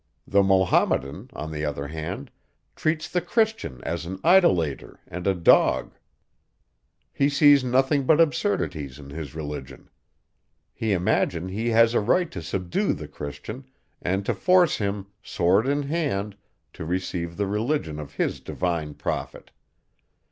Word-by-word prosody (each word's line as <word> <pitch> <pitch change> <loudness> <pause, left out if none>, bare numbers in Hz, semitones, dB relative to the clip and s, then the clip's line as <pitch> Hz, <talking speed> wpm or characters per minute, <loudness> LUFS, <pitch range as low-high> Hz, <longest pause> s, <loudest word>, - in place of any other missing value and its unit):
The 100 - +3
Mahometan, 95 -7 +2
on 80 +1 -6
the 75 0 -4
other 70 -1 -3
hand, 80 0 -6 0.4
treats 155 0 -1
the 180 - -1
Christian 215 - -1
as 85 +1 -3
an 90 +3 -5
idolater 90 - +3
and 90 +2 -5
a 95 - +3
dog. 85 -2 +4 1.2
He 140 0 +2
sees 145 -1 +5
nothing 135 +3 +2
but 160 0 +5
absurdities 95 - 0
in 70 -1 -11
his 75 -2 -7
religion. 75 -4 -7 0.8
He 110 -2 -2
imagines 90 -1 0
he 110 +4 -1
has 115 0 +5
a - - +3
right 165 - +1
to 85 - -6
subdue 90 +2 -1
the - - -7
Christian, 75 - -8 0.4
and 95 +2 -1
to - - +1
force 180 -2 +3
him, 100 -1 -2 0.2
sword 95 +7 +2
in 145 +1 +1
hand, 140 - -2 0.4
to 85 - -7
receive 85 0 -3
the 100 - 0
religion 105 - -1
of 75 -2 -9
his - - -1
divine 80 -5 -3
prophet. - - -5
95 Hz, 140 wpm, -25 LUFS, 80-135 Hz, 1.2 s, sees